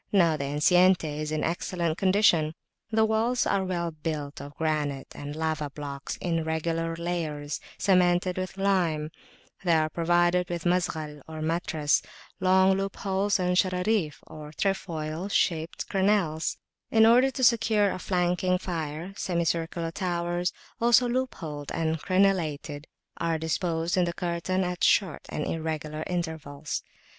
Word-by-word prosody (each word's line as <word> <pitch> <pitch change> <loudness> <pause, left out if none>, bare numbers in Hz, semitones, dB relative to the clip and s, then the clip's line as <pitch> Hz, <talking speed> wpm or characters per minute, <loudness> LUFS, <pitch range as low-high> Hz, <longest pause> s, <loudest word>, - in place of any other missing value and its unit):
Now, 170 -5 +4
the 140 -2 -3
enceinte 180 +6 +4 0.2
is 155 0 -3
in 155 - -1
excellent 170 -1 -1
condition. 185 -5 +3 0.3
The 220 -1 +3
walls 225 +3 +1
are 195 - +1
well 175 -2 -2
built 150 -3 -5
of 145 +1 -10
granite 150 -4 -1
and 145 +1 -7
lava 155 -2 -1
blocks, 140 -1 -6
in 165 -2 -1
regular 165 +1 -1
layers, 160 -4 -3 0.2
cemented 180 -1 +3
with 185 +1 -4
lime; 175 -6 +1 0.5
they 170 -3 +3
are 155 -1 +1
provided 175 +1 +2
with 175 -1 -3
"Mazghal" 160 -4 -1
(or 160 -1 -7
"Matras") 160 -2 +1 0.4
long 190 +1 +5
loopholes, 195 0 0
and 180 0 +1
"Shararif" 180 -2 +1
or 150 -1 -10
trefoil 170 -2 -2
shaped 165 -4 0
crenelles: 190 -5 +1 0.3
in 220 -1 +5
order 245 +4 +6
to 260 0 -4
secure 220 -4 +4
a 185 - -4
flanking 180 0 +1
fire, 165 0 -4
semicircular 170 -2 -1
towers, 175 -1 -1 0.3
also 240 +1 +5
loopholed 170 - -3
and 160 -1 0
crenellated, 160 -6 +1 0.3
are 165 -1 0
disposed 165 +1 -1
in 180 - +4
the 170 - -2
curtain 175 +2 -1
at 180 0 -3
short 190 -6 +2
and 150 - -3
irregular 155 -1 -3
intervals. 160 -4 -4
170 Hz, 135 wpm, -27 LUFS, 155-185 Hz, 0.5 s, order